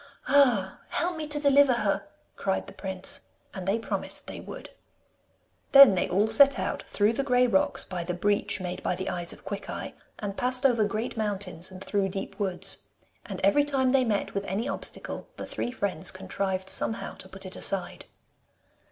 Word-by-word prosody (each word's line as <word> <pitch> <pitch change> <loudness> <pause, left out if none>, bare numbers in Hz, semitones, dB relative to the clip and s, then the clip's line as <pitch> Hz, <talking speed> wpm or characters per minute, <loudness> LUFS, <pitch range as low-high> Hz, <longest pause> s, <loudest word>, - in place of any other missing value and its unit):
'Ah, 245 -9 +3
help 350 +2 -1
me 310 -1 -5
to 295 0 +3
deliver 280 -2 +5
her!' 215 +4 -1 0.3
cried 190 -1 -2
the - - -11
prince. 190 -1 -1 0.3
And 185 -1 -7
they 200 +3 +2
promised 230 - -3
they - - -8
would. - - -10 1.0
Then 275 -6 +10
they 180 - -1
all 195 +4 +2
set 270 +6 +6
out - - -3
through 210 +2 +1
the 255 - -1
grey 250 -2 +3
rocks, 195 -6 +2
by 180 -2 -5
the 175 +1 -4
breach 205 +3 0
made 180 -1 -5
by 180 - -1
the 190 +2 -4
eyes 175 -1 -1
of - - -13
Quickeye, 200 0 -6 0.3
and 200 -2 -5
passed 255 +3 +1
over 235 -5 +4
great 215 +3 -4
mountains 195 -4 -2
and 185 0 -9
through 200 -2 0
deep 195 +3 -6
woods. 190 -3 0 0.4
And - - -6
every 290 -1 +4
time 270 -3 +1
they 270 -1 +3
met 215 -4 -1
with 200 0 -3
any 205 +7 -2
obstacle - - -3
the - - -6
three - - -3
friends 195 -7 0
contrived 190 0 -3
somehow 225 +3 +2
to 190 - -9
put 195 +1 -9
it 185 - -6
aside. 195 -2 +1
205 Hz, 185 wpm, -27 LUFS, 190-255 Hz, 1.0 s, Then